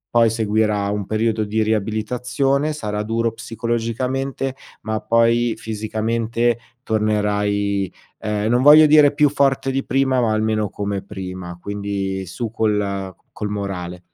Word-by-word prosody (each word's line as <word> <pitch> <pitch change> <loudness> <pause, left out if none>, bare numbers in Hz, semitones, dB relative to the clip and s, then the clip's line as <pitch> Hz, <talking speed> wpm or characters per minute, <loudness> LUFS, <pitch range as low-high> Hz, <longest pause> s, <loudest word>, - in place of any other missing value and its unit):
poi 115 -1 +6
seguirà 105 -2 +1
un 105 -2 -2
periodo 110 0 0
di 110 +1 -1
riabilitazione, 120 +7 0
sarà 105 -8 -3
duro 115 +1 -1
psicologicamente, 120 +4 -2 0.3
ma 110 -1 -2
poi 115 0 +2
fisicamente 115 +2 -1 0.3
tornerai, 105 -3 0 0.3
ehm, 105 +1 -1
non 120 +1 +3
voglio 150 +2 +9
dire 150 -1 +6
più 150 +1 +4
forte 135 -1 +1
di 135 +1 -1
prima, 135 -1 +1
ma 115 -2 +1
almeno 110 -1 0
come 100 0 -3
prima; 90 -3 -7
quindi 100 -2 -3
su 110 +6 -4
col 100 -4 -1 0.2
col 105 -1 -3
morale. 90 -4 -4
110 Hz, 125 wpm, -21 LUFS, 105-120 Hz, 0.3 s, voglio